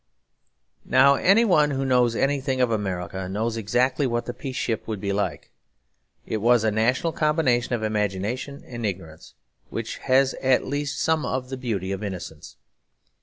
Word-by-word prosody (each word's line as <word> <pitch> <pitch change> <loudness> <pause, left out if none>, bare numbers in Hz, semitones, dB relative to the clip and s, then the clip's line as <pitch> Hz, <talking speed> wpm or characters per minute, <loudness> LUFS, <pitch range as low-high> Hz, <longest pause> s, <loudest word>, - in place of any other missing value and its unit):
Now 135 +2 +5
any 195 - +4
one 150 -8 +4
who 135 -1 -2
knows 125 -3 +3
anything 135 -1 0
of 125 -2 +2
America 95 -3 -3
knows 110 +4 -2
exactly 125 +5 +1
what 120 -1 -2
the 120 - -4
Peace 130 +1 -7
Ship 115 -3 -1
would 110 -3 -3
be 100 0 -2
like. 95 -7 -3 0.7
It 110 - -2
was 120 +1 +3
a 110 - +2
national 125 +9 +1
combination 140 -6 +1
of 110 - -4
imagination 110 - -2
and 120 -5 -7
ignorance, 85 -6 -6 0.3
which - - -5
has 130 +1 +3
at 130 -1 +3
least 145 0 -3
some 160 -1 +1
of 125 0 -3
the 130 - -4
beauty 105 -7 -3
of 95 +1 -4
innocence. 90 -6 -7
120 Hz, 165 wpm, -24 LUFS, 105-135 Hz, 0.7 s, Now